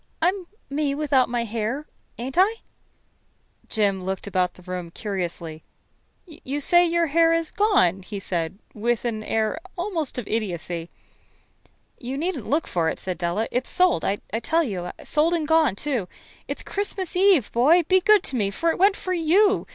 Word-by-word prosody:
I'm 360 +2 0 0.2
me 280 0 -1
without 280 -4 +2
my 240 -1 -1
hair, 230 +6 -3 0.3
ain't 255 +3 -5
I?" 390 +5 +4 1.1
Jim 200 -4 0
looked 190 0 -3
about 185 -3 0
the 180 - -16
room 180 -1 -5
curiously. 170 -5 -4 0.6
"You 295 -4 -6
say 345 +4 +5
your 340 0 +2
hair 330 +2 +3
is 330 -1 -1
gone?" 290 - +2
he 205 +2 -7
said, 170 -2 -3 0.2
with 235 +2 -1
an 220 -2 -2
air 220 +6 -1 0.2
almost 345 -7 -2
of 245 - -4
idiocy. 175 -6 -3 1.1
"You 260 +2 -5
needn't 350 +6 -3
look 300 +3 +1
for 165 -2 0
it," - - -5
said 185 -1 -5
Della. 175 +6 -1
"It's 250 +1 -2
sold, 365 -1 +2
I 195 - +1 0.3
tell 330 +5 +2
you 185 - -4
sold 320 +3 +2
and 315 -3 -2
gone, 320 -9 +3
too. 245 -5 -2 0.4
It's - - -5
Christmas 390 -3 -2
Eve, 370 - +4
boy. 305 +9 +4
Be 375 +3 +3
good 425 0 +5
to 265 - -4
me, 205 -5 +1
for 330 +12 0
it - - -5
went 395 +2 +5
for 370 - -3
you. 365 +5 +3
265 Hz, 170 wpm, -24 LUFS, -, 1.1 s, say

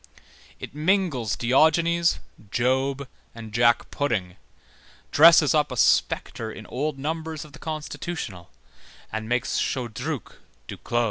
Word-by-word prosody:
It - - -8
mingles 150 - 0
Diogenes, 165 +8 +3 0.3
Job, 130 +4 0 0.3
and 110 -2 -9
Jack 120 +1 +3
pudding, 100 -11 -2 0.8
dresses 160 -2 +7
up 150 -2 +2
a 125 - -5
spectre 110 0 +1
in 110 - -10
old 145 +5 -3
numbers 160 +2 -4
of 150 - -16
the 150 - -12
Constitutional, 155 - -6 0.6
and 110 0 -4
makes 125 0 0
Chodruc 125 - -4 0.3
Duclos. 120 - -3
135 Hz, 115 wpm, -25 LUFS, 120-155 Hz, 0.8 s, dresses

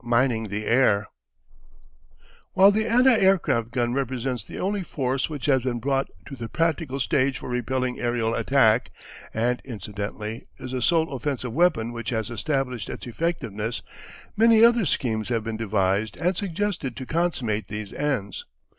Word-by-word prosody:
MINING 120 -1 +1
THE 105 +1 -4
AIR 110 -4 +3 1.5
While 195 +2 +7
the 220 +2 0
anti 250 +3 +5
aircraft 185 - +2
gun 120 0 0
represents 130 -3 -2
the - - -9
only 200 +2 -1
force 135 -5 -1
which 145 -4 -5
has 135 -3 +3
been 125 -1 -2
brought 135 +2 0 0.2
to 140 - -8
the 115 -3 -6
practical 160 -4 -1
stage 130 +1 +1
for - - -8
repelling 125 +1 -1
aerial 120 -1 0
attack, 120 -4 +3 0.4
and 120 +2 0
incidentally 105 -1 -6
is 130 - -7
the 130 -1 -2
sole 160 +2 +2
offensive 130 -2 -3
weapon 155 -9 +2
which 115 -1 -4
has 110 -2 -2
established 125 -3 -2
its - - -6
effectiveness, 115 - -3 0.5
many 225 +1 +6
other 235 -5 +4
schemes 110 -5 -1
have 115 -3 0
been 110 0 -4
devised 105 -1 0
and 180 +2 +1
suggested 180 - -2
to 130 - -6
consummate 130 -10 -1
these 105 -1 -6
ends. 135 -9 -2
125 Hz, 155 wpm, -25 LUFS, 115-155 Hz, 1.5 s, While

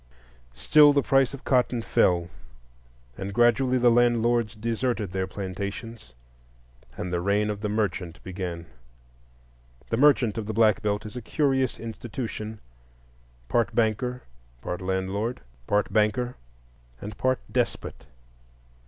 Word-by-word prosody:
Still 145 - +6
the 140 -1 +2
price 135 -2 +3
of 135 - -14
cotton 125 -2 +1
fell, 85 -5 +2 0.9
and 95 +1 -4
gradually 120 +4 +3
the 120 -1 +4
landlords 120 -1 +2
deserted 115 -2 -2
their 95 0 -2
plantations, 100 - -6 0.8
and 90 - -4
the 85 - 0
reign 105 +3 +1
of 105 -1 -6
the 105 - -2
merchant 95 -5 -2
began. 90 -3 -5 1.3
The 115 - +1
merchant 130 -6 +4
of 105 - -5
the 110 - -3
Black 110 -3 +4
Belt 105 0 -1
is 105 - -8
a 125 - -5
curious 135 0 0
institution,—part - - -6
banker, 120 +3 0 0.4
part 90 - -4
landlord, 95 +6 -2 0.3
part 105 -1 +1
banker, 110 +4 +1 0.6
and 105 +6 -7
part 130 +3 +1
despot. - - -2
110 Hz, 120 wpm, -26 LUFS, 95-120 Hz, 1.3 s, Still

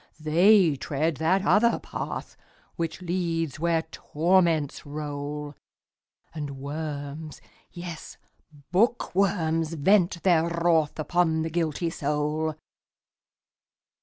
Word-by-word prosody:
they 170 +2 +5
tread 150 +3 -1
that 185 +5 +1
other 235 +3 +4
path, - - -6 0.4
Which 165 +1 -4
leads 165 -4 -2
where 165 0 +1
torments 165 -2 +1
roll, 145 0 -5 0.8
And 145 -3 -5
worms, 145 +1 -6 0.3
yes, 175 -2 -8 0.5
bookworms, 180 -6 +1
vent 175 +2 +2
their 170 -3 +3
wrathUpon 165 0 +1
the 160 - -3
guilty 165 0 -1
soul. 150 +1 -1
160 Hz, 85 wpm, -26 LUFS, 150-175 Hz, 0.8 s, they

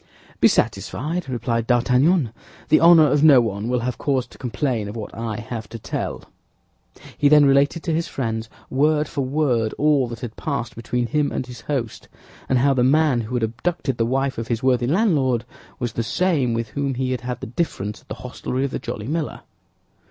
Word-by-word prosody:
"Be - - +6
satisfied," 160 +2 -1
replied 115 -2 -1
D'Artagnan; 125 - +3 0.4
"the 155 - +6
honor 165 -1 +7
of 145 0 +2
no 145 -5 +8
one 110 -1 -2
will 125 -1 +1
have 125 0 -3
cause 135 -3 0
to - - -18
complain 125 -3 -2
of 105 - -7
what 110 -2 -6
I 115 -1 -4
have 115 -2 -6
to 115 - -7
tell." 110 - -4 1.0
He 145 - +4
then 150 -1 +7
related 140 +4 +3
to 165 - -1
his 165 +1 -1
friends, 115 -3 -3 0.2
word 150 +2 +2
for 145 - -3
word, 130 -5 0
all 145 -4 +3
that 115 0 -8
had 120 -3 -6
passed 140 -6 -3
between 120 +1 -2
him 150 +3 0
and - - -3
his 125 -1 -10
host, 125 -7 -4 0.4
and 130 - +3
how 135 +3 +3
the 125 -2 +2
man 140 -1 +3
who 115 +3 -5
had 120 - 0
abducted 135 +5 -2
the 115 - +3
wife 135 0 0
of 115 - -4
his 115 +1 -2
worthy 125 -2 +2
landlord 140 - +2 0.3
was 120 -2 -3
the 115 - -1
same 145 -3 +1
with 115 -1 -3
whom 140 +3 -2
he 130 0 -1
had 125 -3 -2
had 125 +1 -4
the - - -6
difference 110 - -3
at - - -30
the - - -6
hostelry 125 +1 -3
of 140 - -3
the - - -3
Jolly 115 -2 -6
Miller. 155 +1 -3
130 Hz, 205 wpm, -22 LUFS, 115-145 Hz, 1.0 s, no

